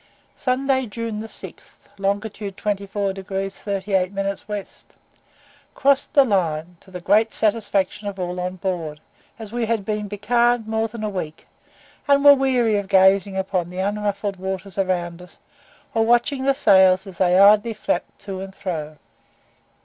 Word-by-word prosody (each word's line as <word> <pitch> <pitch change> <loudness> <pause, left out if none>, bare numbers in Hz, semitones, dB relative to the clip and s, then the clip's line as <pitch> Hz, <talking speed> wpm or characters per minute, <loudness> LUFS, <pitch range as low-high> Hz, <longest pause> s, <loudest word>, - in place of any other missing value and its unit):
SUNDAY, 260 0 0
JUNE 225 0 -5
6, - - -12 0.2
long. 200 +1 0
24 200 -1 -3
degrees 195 0 -5
38 195 -2 -1
minutes 195 0 -3
W. 205 -2 -4 1.1
Crossed 280 0 +2
the 280 -2 +7
Line, 175 -5 -1
to - - -20
the 180 -1 -7
great 215 +5 +2
satisfaction 205 -2 0
of 200 -1 -5
all 180 0 -3
on 180 +1 -3
board, 170 -5 -4 0.4
as 220 -2 -9
we 235 -1 -2
had 225 -3 -1
been 210 0 -2
becalmed 235 +3 +1
more 220 0 0
than 225 0 -8
a - - 0
week, 160 -5 -6 0.6
and 280 0 +4
were 285 - +11
weary 255 -5 +2
of 200 -1 -3
gazing 190 0 +4
upon 185 -2 -1
the 180 - -9
unruffled 205 0 -2
waters 190 +1 -5
around 175 -2 -1
us, 180 - -15 0.6
or 225 -1 +2
watching 240 +4 +2
the 275 0 +3
sails 190 -3 +5
as 190 -3 -11
they 180 -1 +4
idly 210 +3 +5
flapped 185 -3 -3
to 195 -2 -6
and 195 0 -8
fro. 155 -5 -5
200 Hz, 155 wpm, -22 LUFS, 190-220 Hz, 1.1 s, were